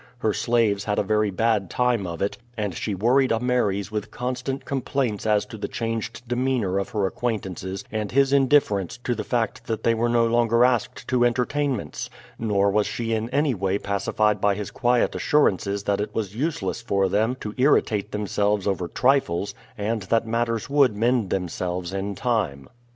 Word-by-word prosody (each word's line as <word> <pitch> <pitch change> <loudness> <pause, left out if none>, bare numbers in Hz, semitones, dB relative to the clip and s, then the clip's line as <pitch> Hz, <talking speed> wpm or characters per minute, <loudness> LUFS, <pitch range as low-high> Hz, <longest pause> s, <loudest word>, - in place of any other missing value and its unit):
Her 110 -3 0
slaves 110 -4 +1
had 105 -1 -1
a - - +2
very 105 +1 +1
bad 105 -1 +1
time 120 -4 +1
of 85 +1 -3
it, 100 - -2 0.2
and 105 -3 -2
she 100 +5 -3
worried 125 +7 +3
Ameres 115 -4 0
with 105 -1 -3
constant 130 +2 -4
complaints 130 -5 -1
as 105 -1 +3
to 110 - -10
the - - -3
changed 115 +1 -4
demeanor 120 -6 0
of 100 - -3
her 105 -3 0
acquaintances 95 -3 -3
and 110 -2 -3
his 135 +1 +3
indifference 130 - +3
to 125 - 0
the 115 - -4
fact 120 -3 -2
that 110 -1 -3
they 115 - +3
were 115 +1 0
no 120 -1 +3
longer 115 +1 +3
asked 125 -3 -1
to 125 -1 +3
entertainments; 125 - -1 0.3
nor 100 -3 +2
was 105 +1 +2
she 115 -1 -2
in 110 +1 -1
any 140 +1 +1
way 95 -1 0
pacified 100 +1 0
by 100 -1 +3
his 105 -1 -5
quiet 120 0 +2
assurances 100 -8 +1
that 100 0 0
it 105 0 -5
was 105 -3 -3
useless 120 - -2
for 100 -5 +1
them 110 +6 +1
to 105 - -5
irritate 110 -6 +2
themselves 105 -1 0
over 95 -3 -1
trifles, 125 -6 +1 0.2
and 110 +1 -1
that 115 +4 +1
matters 115 0 -1
would 140 -6 +3
mend 115 -2 +2
themselves 90 0 -3
in 100 +1 -3
time. 95 - -1
110 Hz, 180 wpm, -24 LUFS, 100-120 Hz, 0.3 s, worried